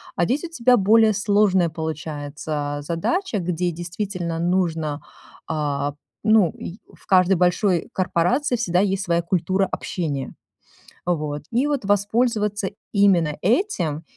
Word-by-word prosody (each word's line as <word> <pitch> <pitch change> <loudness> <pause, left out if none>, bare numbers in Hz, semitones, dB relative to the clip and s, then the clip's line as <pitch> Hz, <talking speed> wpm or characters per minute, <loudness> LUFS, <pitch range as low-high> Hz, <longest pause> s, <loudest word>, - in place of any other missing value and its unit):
А 175 - +2
здесь 265 - -1
у 345 - -5
тебя 250 -5 +3
более 215 +2 +5
сложная 200 -4 +2
получается 150 -2 -4
задача, 205 - -1
а, - - 0
где 175 0 -1
действительно 175 0 -4
нужно, 165 -4 0 0.5
а. 145 -2 -1 0.3
Ну, 215 -6 +5
и 180 +5 -9
в - - -21
каждой 185 0 +5
большой 180 0 +1
корпорации 235 - +1
всегда 180 -7 +1
есть 195 0 +1
своя 170 -1 +1
культура 185 +2 +1
общения. 145 -7 -3 0.7
Вот. 150 -4 -2
И 245 +5 +1
вот 285 -7 -1
воспользоваться 210 0 +1 0.2
именно 180 -7 +3
этим. 185 - 0
180 Hz, 125 wpm, -22 LUFS, 160-210 Hz, 0.7 s, более